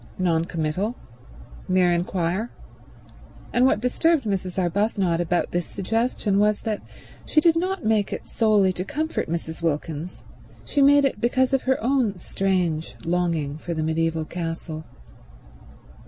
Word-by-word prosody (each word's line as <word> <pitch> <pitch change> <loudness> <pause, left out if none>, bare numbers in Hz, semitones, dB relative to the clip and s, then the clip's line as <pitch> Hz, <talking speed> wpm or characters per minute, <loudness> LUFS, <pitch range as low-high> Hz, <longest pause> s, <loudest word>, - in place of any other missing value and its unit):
Non 170 -3 +1
committal. 170 +8 -2 0.7
Mere 185 -1 +3
inquiry. 175 +4 0 1.1
And 250 +2 +5
what 260 - +2
disturbed 310 +4 +2
Mrs. 190 -3 -2
Arbuthnot 185 -1 +1
about 175 0 0
this 175 -1 -1
suggestion 215 0 0
was 210 0 +2
that 215 -2 -2 0.4
she 310 - +3
did 330 +1 +4
not 370 - -1
make 215 -2 +2
it - - -5
solely 210 -4 +3
to 180 - -3
comfort 310 - -2
Mrs. 165 -1 -4
Wilkins; 160 +1 -3 0.4
she 285 - +1
made 285 0 +6
it 255 -6 -1
because 255 +2 +2
of 270 - +3
her 265 - +4
own 245 -6 +1
strange 180 -3 -1
longing 165 -4 0
for 170 +1 -4
the 160 - -1
mediaeval 160 0 0
castle. 165 -2 -5
185 Hz, 140 wpm, -24 LUFS, 165-230 Hz, 1.1 s, made